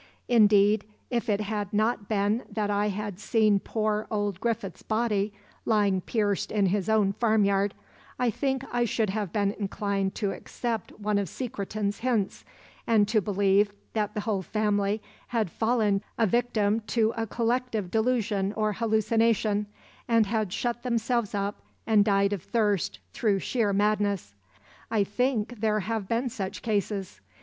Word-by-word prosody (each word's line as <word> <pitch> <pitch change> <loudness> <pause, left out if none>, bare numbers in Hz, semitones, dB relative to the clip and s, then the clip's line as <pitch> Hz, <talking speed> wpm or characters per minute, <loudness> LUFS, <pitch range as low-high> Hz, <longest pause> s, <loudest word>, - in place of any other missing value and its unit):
Indeed, 210 -2 +5 0.3
if 235 -1 -1
it 205 0 +2
had 205 -1 -3
not 215 -1 0
been 210 +2 +1
that 205 -1 -1
I 205 +1 +1
had 205 -1 -4
seen 215 -2 +3
poor 215 0 -1
old 205 -3 -1
Griffith's 225 -5 -2
body 215 -2 0 0.3
lying 205 -4 +2
pierced 205 -1 -1
in 210 -2 +2
his 195 +1 0
own 210 -3 +3
farmyard, 200 -3 +2 0.4
I 250 -2 +1
think 265 +3 -1
I 245 0 +2
should 220 -3 0
have 205 -3 -2
been 200 -2 +1
inclined 200 -1 -1
to 200 -3 -1
accept 230 -2 -4
one 210 -1 +1
of 195 -4 -2
Secretan's 205 -4 -3
hints, 225 -5 -1 0.4
and 215 -3 +4
to 215 -1 +3
believe 200 +1 +2 0.2
that 210 -1 -1
the 210 - -1
whole 205 -3 -1
family 205 +1 0 0.2
had 220 -7 -1
fallen 220 -3 +1 0.2
a 230 - +3
victim 220 -1 +1
to 225 0 +2
a 225 0 -2
collective 230 -4 -1
delusion 220 -4 +1
or 215 -1 0
hallucination, 220 -1 +1 0.4
and 230 -2 +4
had 215 -2 -1
shut 240 +4 -2
themselves 235 -3 0
up 200 +1 -2 0.2
and 215 -2 +5
died 200 -1 +2
of 195 - -3
thirst 210 -4 0 0.2
through 205 -3 +1
sheer 215 +1 0
madness. 205 - +1 0.6
I 220 -3 +2
think 240 +2 -1
there 215 -1 +1
have 220 -1 -3
been 235 +4 0
such 205 -6 -5
cases. 200 - -2
210 Hz, 150 wpm, -27 LUFS, 200-225 Hz, 0.6 s, Indeed